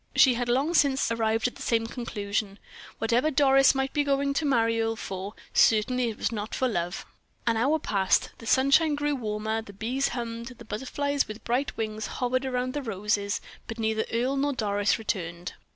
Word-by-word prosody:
She 260 - +6
had 240 0 -2
long 275 +7 +1
since 275 -6 +3
arrived 225 0 +1
at 245 - -7
the - - -12
same 225 -1 +1
conclusion. 205 -4 -3 0.4
Whatever 235 +6 +2
Doris 270 -1 +5
might 270 0 -1
be 295 - +2
going 280 0 +1
to 305 - -1
marry 230 -3 +2
Earle 225 0 0
for, 195 0 -6 0.2
it - - -29
certainly 235 +2 +3
was 220 - -2
not 215 -1 -4
for 260 - +1
love. 175 -6 -3 0.4
An 230 - +2
hour 270 +8 +2
passed. 195 -10 +1
The 230 - -10
sunshine 275 +5 +4
grew 290 0 0
warmer, 220 -3 -2
the 200 -2 -12
bees 245 +7 -1
hummed, 235 -1 -5
the 235 - -12
butterflies 275 +6 -1
with 215 +1 -8
bright 250 +4 -1
wings 215 -1 -3
hovered 255 +1 -1
round 255 0 -1
the 290 - -2
roses; 205 -3 -1 0.3
but 225 - -6
neither 220 -1 0
Earle 250 +4 0
nor 285 +1 +1
Doris 205 -3 +1
returned. 175 -5 -4
230 Hz, 185 wpm, -27 LUFS, 215-270 Hz, 0.4 s, She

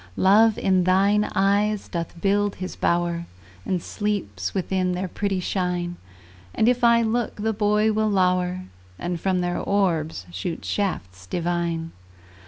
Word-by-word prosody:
Love 210 +3 +5
in 185 -1 +2
thine 200 +3 +3
eyes 205 +1 +2
doth 170 0 -5
build 205 +2 +1
his 185 - -6
bower, 170 0 0 0.4
And 180 -3 -1
sleeps 175 - -3
within 185 -1 -1
their 185 +1 -2
pretty 195 +1 -2
shine; 180 -1 -2 0.6
And 220 - +3
if 245 0 +2
I 235 0 +5
look, 230 +1 -1
the 220 +1 -1
boy 210 +1 +2
will 215 0 +1
lower, 185 -2 +1 0.4
And 175 -1 -4
from 185 -2 +1
their 175 0 -1
orbs 165 - 0
shoot 90 - -5
shafts 95 - -3
divine. 170 - -2
185 Hz, 140 wpm, -24 LUFS, 175-205 Hz, 0.6 s, Love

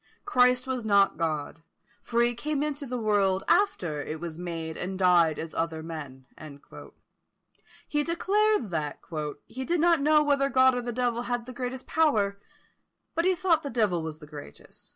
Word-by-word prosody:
Christ 250 -8 +3
was 260 -2 -3
not 200 -3 +3
God; 160 -1 -2 0.4
for 235 0 +1
he 240 0 +2
came 290 +4 -2
into 290 -1 -3
the 250 0 -3
world 200 -4 +1
after 175 - +1
it 155 +2 -5
was 170 -1 -6
made, 165 -2 -5
and 185 +1 -4
died 175 -4 +4
as 160 0 -6
other 160 -1 -2
men." 145 -5 -8 1.6
He 295 0 0
declared 390 - +1
that 150 -3 -2 0.5
"he 260 - -6
did 340 +5 0
not 335 -2 +4
know 300 +1 +4
whether 280 -1 +2
God 260 -1 +5
or 245 - -1
the 240 0 -4
devil 240 0 -1
had 245 -1 -3
the 255 - -8
greatest 250 +1 -5
power; 210 -11 +1 0.7
but 335 - 0
he 370 0 +3
thought 335 -2 +2
the 280 - -5
devil 210 -8 +1
was 160 -1 -5
the 155 - -13
greatest. 145 - -13
235 Hz, 175 wpm, -27 LUFS, -, 1.6 s, God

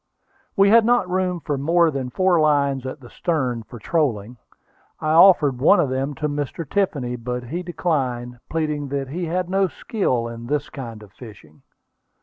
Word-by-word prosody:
We 200 0 +5
had 230 0 +7
not 240 -4 +2
room 180 -1 -1
for 145 -1 -2
more 165 +3 +3
than 135 -3 -4
four 185 +4 +2
lines 140 -3 +1
at 135 +2 -7
the 120 - -13
stern 130 -9 -1
for 120 +2 -12
trolling. 120 -4 -1 0.6
I 155 - -1
offered 160 -6 +6
one 165 +9 +5
of 150 -6 +2
them 135 +2 -2
to 150 - -2
Mr. 145 +2 -4
Tiffany; 140 -10 -1
but 125 +1 -4
he 160 +9 -4
declined, 130 -9 -2
pleading 150 -3 -2
that 135 -1 -3
he 175 +5 -3
had 180 +2 -2
no 190 +1 +1
skill 130 - -2
in 115 0 -8
this 145 +1 -2
kind 115 -6 -8
of 100 - -16
fishing. 100 -10 -14
145 Hz, 175 wpm, -22 LUFS, 125-175 Hz, 0.6 s, had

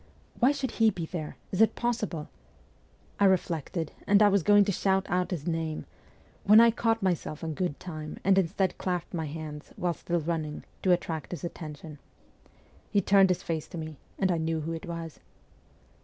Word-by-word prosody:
' - - -25
Why 255 +4 +5
should 275 -4 -2
he 225 -1 +4
be 175 -6 -4
there? 160 -2 -6
Is 190 - +1
it 225 - +5
possible? 215 -10 -2 0.5
' - - -33
I 200 - +5
reflected, 170 -3 0 0.2
and 200 0 +6
was 200 -1 +3
going 205 +3 +5
to 200 - +1
shout 190 0 +1
out 180 0 +1
his 165 -6 -4
name, 160 -2 -2 0.6
when 210 +2 +8
I 230 0 +7
caught 225 -1 0
myself 170 -4 -1
in 160 -1 -2
good 175 -2 -2
time, 155 -4 -7
and 195 0 +5
instead 190 +1 0
clapped 180 -2 -2
my 160 -3 -2
hands, 150 0 -7
while 175 -1 0
still 175 +1 -2
running, 160 -2 -3 0.2
to 185 - +3
attract 165 -3 -1
his 175 - -6
attention. 155 -3 -7 0.9
He 205 - +3
turned 195 0 +5
his 180 - 0
face 160 -2 -3
to - - -8
me 155 -2 -6 0.2
and 190 -1 +2
I 170 - +1
knew 160 0 -1
who 165 +2 -3
it 165 - -6
was. 165 -2 -6
175 Hz, 190 wpm, -28 LUFS, 160-195 Hz, 0.9 s, when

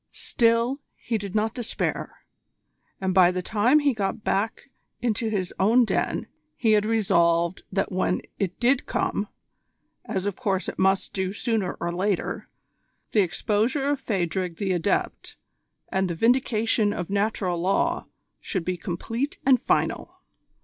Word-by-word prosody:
Still, 235 +3 +1 0.2
he 225 -2 -2
did 200 0 -6
not 220 +1 +1
despair; 240 -3 -3 0.7
and 190 -1 0
by 180 -1 +6
the 180 0 -2
time 225 - +3
he 290 -2 +3
got 210 0 -2
back 225 +7 -1 0.3
into 230 -1 0
his 190 -4 -2
own 230 +5 +5
den - - -1 0.3
he 225 - +2
had 210 0 +3
resolved 170 -5 +2
that 195 0 0
when 185 0 0 0.2
it 185 -3 -2
did 255 +2 +2
come, - - -1 0.8
as 195 -5 -2
of 205 -2 -1
course 195 -6 -1
it - - -5
must 190 0 +2
do 190 -1 -1
sooner 210 -2 -1
or 170 - -2
later, 190 +2 -1 0.6
the 210 - +4
exposure 215 - 0
of 290 - -1
Phadrig 180 -5 -1
the 195 -2 -1
Adept 180 +2 -1 0.5
and 190 -1 0
the 170 - -2
vindication 225 -1 +2
of 180 +1 -4
Natural 200 -3 0
Law 185 +3 +1 0.3
should 185 -5 -3
be 185 -1 -1
complete 225 - -3
and 260 -2 +5
final. - - -1
205 Hz, 145 wpm, -25 LUFS, 185-230 Hz, 0.8 s, by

